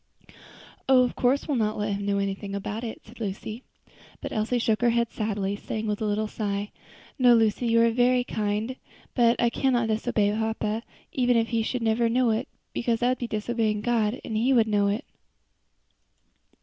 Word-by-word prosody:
"Oh! 255 -1 +7
of 245 - -2
course 260 +3 +1
we'll 290 -4 0
not 215 -2 0
let 210 -1 -1
him 200 0 -3
know 200 0 +1
anything 200 0 -3
about 205 +3 -4
it," 225 - -6
said 235 +3 -15
Lucy. 215 +2 -5 0.6
But - - -6
Elsie 220 +3 0
shook 225 -2 +1
her 240 - +4
head 235 0 +1
sadly, 205 -2 -2
saying 215 +1 -5
with 210 -1 -2
a - - 0
little 210 +1 0
sigh, 205 -1 -3 0.5
"No, 245 -2 +6
Lucy, 225 +1 +2
you 230 0 +4
are 230 - +4
very 245 +1 +3
kind, 215 +2 -2 0.4
but 235 -1 +3
I 235 -1 +3
cannot 240 -3 +1
disobey 215 -1 +1
papa, 220 0 -1 0.3
even 245 -2 +2
if 225 0 +1
he 230 -1 +1
should 240 +2 -2
never 230 +1 +2
know 245 0 +2
it, 225 +3 -1 0.3
because 235 -1 -1
that 245 - +3
would 255 - 0
be 240 - -3
disobeying 215 -1 -1
God, 230 +1 0
and 220 - -4
He 240 +5 +2
would 230 -3 +5
know 205 -1 +2
it." 210 +8 -1
225 Hz, 190 wpm, -26 LUFS, 210-240 Hz, 0.6 s, Oh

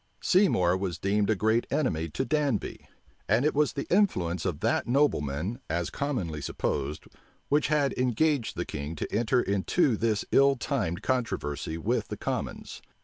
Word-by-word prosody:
Seymour 95 - +3
was 95 -4 -3
deemed 100 +4 +1
a 110 - +3
great 110 +4 +1
enemy 85 - 0
to - - -2
Danby; 140 -4 -1 0.4
and 115 +7 +3
it 155 - +2
was 150 0 +2
the 140 - -3
influence 90 - +1
of 90 -6 -2
that - - +1
nobleman, 110 - 0
as 85 0 -1
commonly 95 - -3
supposed, 70 +1 -3 0.4
which 145 +1 +3
had 145 -2 +2
engaged 125 +1 +1
the - - -2
king 75 +2 -5
to 75 - -4
enter 120 +3 +2
into 110 - +1
this 110 -1 0
ill 140 0 +5
timed 110 - -2
controversy 80 - -2
with 80 - -1
the - - -6
commons. - - -4
110 Hz, 155 wpm, -28 LUFS, 85-140 Hz, 0.4 s, ill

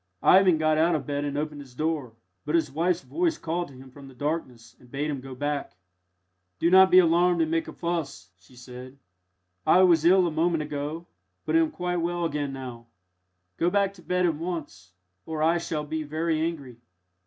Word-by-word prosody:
Ivan 185 -3 +6
got 155 0 +2
out 165 +1 +3
of 155 - -3
bed 145 0 -2
and 145 0 -3
opened 150 -1 -4
his 130 -3 -15
door, 150 -6 -2 0.3
but 150 +2 -1
his 160 -5 +1
wife's 170 +4 0
voice 335 -2 -1
called 170 +2 -3
to 135 - -15
him 130 0 -13
from 140 +1 -13
the 135 - -14
darkness 125 -5 -4
and 125 - -19
bade 145 +4 -2
him 140 -3 -4
go 130 0 -9
back. 145 -2 -3 0.8
"Do 170 - +1
not 190 0 +7
be 185 - +6
alarmed 175 0 +4
and 160 - -3
make 165 0 0
a - - -6
fuss," 165 - -4
she 95 +8 -21
said; 125 +2 -11 0.7
"I 185 - +5
was 170 -4 +4
ill 185 +2 +5
a 170 - -1
moment 165 0 0
ago, 150 +3 -5 0.4
but - - 0
am 325 -1 +4
quite 180 -10 -3
well 175 0 -1
again 145 -3 -2
now. 125 -3 -8 0.7
Go 170 - +2
back 200 +1 +1
to 190 - -16
bed 180 +2 0
at 170 - +2
once, 150 - -6 0.4
or 155 -1 -2
I 165 +2 +3
shall 155 -2 -3
be 155 +1 -4
very 155 +1 -1
angry." 145 -7 -4
155 Hz, 200 wpm, -26 LUFS, 140-175 Hz, 0.8 s, not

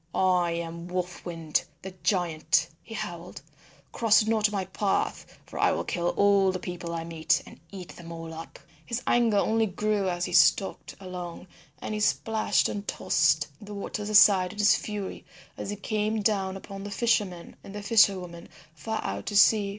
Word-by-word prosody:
"I 180 -2 +2
am 170 0 -5
Wolf 180 0 -4
Wind, 165 -3 -1 0.2
the 190 0 -7
giant," 170 -3 +1
he 225 - -10
howled, 175 -4 -7 0.5
"cross 225 -2 +4
not 215 -1 +2
my 195 -2 -2
path, 195 +2 -2
for - - -8
I - - +4
will - - -2
kill 175 -1 -2
all 200 -1 +4
the 185 - -3
people 180 -1 -6
I 165 -1 -3
meet, 165 -1 0
and - - -14
eat 185 -2 -9
them 170 -1 -10
all 165 -1 -7
up." 160 +1 -9 0.3
His 240 +1 -4
anger 235 -3 +3
only 220 +2 +2
grew 205 0 -1
as 175 0 -1
he - - -6
stalked 195 - +3
along, 180 -2 -7 0.3
and - - -5
he 210 - -2
splashed 220 +1 +1
and 205 0 -5
tossed 160 -3 +2
the 205 0 -8
waters 205 +1 -5
aside 200 -3 +6
in - - -14
his 210 0 +5
fury 205 -3 -5 0.3
as - - -6
he 205 - -3
came 215 +1 -2
down 195 -3 0
upon 195 0 -9
the 205 - -6
fishermen 200 -5 -1
and 200 - -10
fisher 210 -4 +5
women 170 -1 -10 0.2
far 220 +8 -4
out - - -4
to 205 - 0
sea. 205 0 +5
195 Hz, 180 wpm, -27 LUFS, 175-210 Hz, 0.5 s, aside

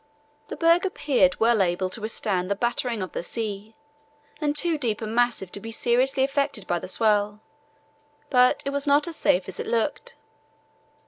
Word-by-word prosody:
The - - -6
berg 335 +1 +3
appeared 260 - +1
well 230 -1 +3
able 180 0 0
to 220 - -7
withstand 200 -4 -1
the 200 - +1
battering 235 -1 -1
of 185 - -7
the - - -4
sea, 215 +2 -5 0.7
and 295 -1 0
too 335 +2 +2
deep 230 -6 -1
and 220 -1 -5
massive 240 -6 0
to - - -6
be 225 - -8
seriously 255 +4 +1
affected 275 -5 -1
by 175 -2 -1
the - - -8
swell; 210 +1 +1 0.9
but 250 -1 +4
it 275 - -1
was 280 +1 -1
not 290 +3 +3
as 335 - -6
safe 180 -9 +1
as 190 - -8
it - - -4
looked. 235 +5 -2
230 Hz, 180 wpm, -25 LUFS, 205-275 Hz, 0.9 s, but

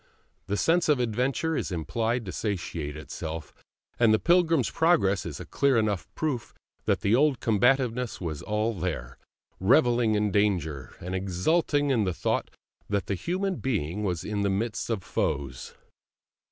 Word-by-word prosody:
The 100 - -1
sense 170 +5 +2
of 145 -4 +4
adventure 125 +7 0
is - - -2
impelled 115 +8 -1
to 95 - -5
satiate 85 -8 -3
itself, 80 +1 -6 0.5
and 115 -2 +5
the 110 - +5
Pilgrim's 165 -4 +3
Progress 155 - +2
is 75 -4 -6
a - - -7
clear 140 -3 +2
enough 105 -4 0
proof 145 -7 -3 0.3
that - - +1
the 100 - +2
old 140 +1 +3
combativeness 125 +2 +1
was 80 -5 -4
all 105 +2 -1
there, 80 - -4 0.4
revelling 120 +1 +4
in 105 -1 +1
danger, 85 -10 0
and 90 +2 -5
exulting 140 - +1
in 115 -5 +2
the 90 -3 -1
thought - - -1 0.4
that 100 -1 0
the - - -2
human 185 - -2
being 105 - -2
was 90 -5 -1
in 105 -1 -2
the 100 - +1
midst 110 +5 -2
of 110 -5 -1
foes. 70 -7 -3
105 Hz, 155 wpm, -27 LUFS, 90-130 Hz, 0.5 s, and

